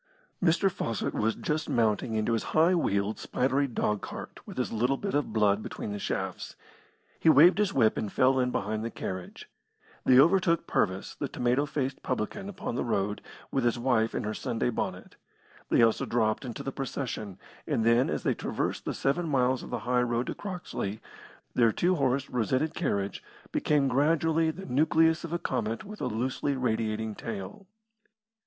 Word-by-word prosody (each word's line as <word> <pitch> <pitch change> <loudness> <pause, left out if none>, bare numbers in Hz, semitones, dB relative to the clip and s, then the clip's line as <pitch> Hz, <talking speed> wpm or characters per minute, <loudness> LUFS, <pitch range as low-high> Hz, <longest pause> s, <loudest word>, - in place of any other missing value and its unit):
Mr. 185 +3 +3
Fawcett 115 -9 -2
was 110 +1 0
just 150 0 -2
mounting 110 0 +1
into 110 +2 +1
his 115 - +1 0.2
high 165 +4 +5
wheeled, 100 - 0
spidery 135 +2 0
dogcart, 105 -4 -3
with - - -9
his 125 - -1
little 125 +5 +1
bit 200 +5 -4
of 145 0 0
blood 105 -1 +2
between 105 - -6
the 105 - -4
shafts. - - -4 0.6
He - - +4
waved 165 +7 +7
his 210 -2 +2
whip 115 - +3
and 105 - -3
fell 130 +1 +3
in 125 0 +2
behind 110 -1 -2
the 115 - -2
carriage. 95 -4 -6 0.6
They 125 - +5
overtook 170 +2 +4
Purvis, 95 -1 -1
the - - -4
tomato 125 +4 0
faced 135 -1 -3
publican, 195 - -3
upon 195 - -5
the - - -1
road, 105 -3 -1 0.3
with 135 - 0
his 120 0 +2
wife 120 -2 +1
in - - -1
her 105 +1 -2
Sunday 120 +2 -1
bonnet. - - -4 0.5
They - - +5
also 115 -1 +2
dropped 110 +2 +1
into 120 -3 -6
the 135 - -3
procession, 125 -7 -4 0.3
and 115 - 0
then, 115 +2 +4
as - - -2
they - - +2
traversed - - -3
the - - -2
seven 160 +5 0
miles 130 -2 +2
of - - -9
the - - -2
high 125 0 +2
road 120 0 0
to - - -3
Croxley, 175 - -5 0.5
their 115 -2 +4
two 175 +10 +2
horsed, 135 -3 +1
rosetted 130 +6 0
carriage 100 - -2 0.3
became 145 -2 +2
gradually 160 +4 +2
the 185 +5 -6
nucleus 160 +5 +3
of 170 - -6
a 170 - 0
comet 115 -6 -2
with 210 +2 -9
a - - 0
loosely 130 +5 -1
radiating 110 -3 -1
tail. 105 - -7
125 Hz, 175 wpm, -28 LUFS, 110-150 Hz, 0.6 s, waved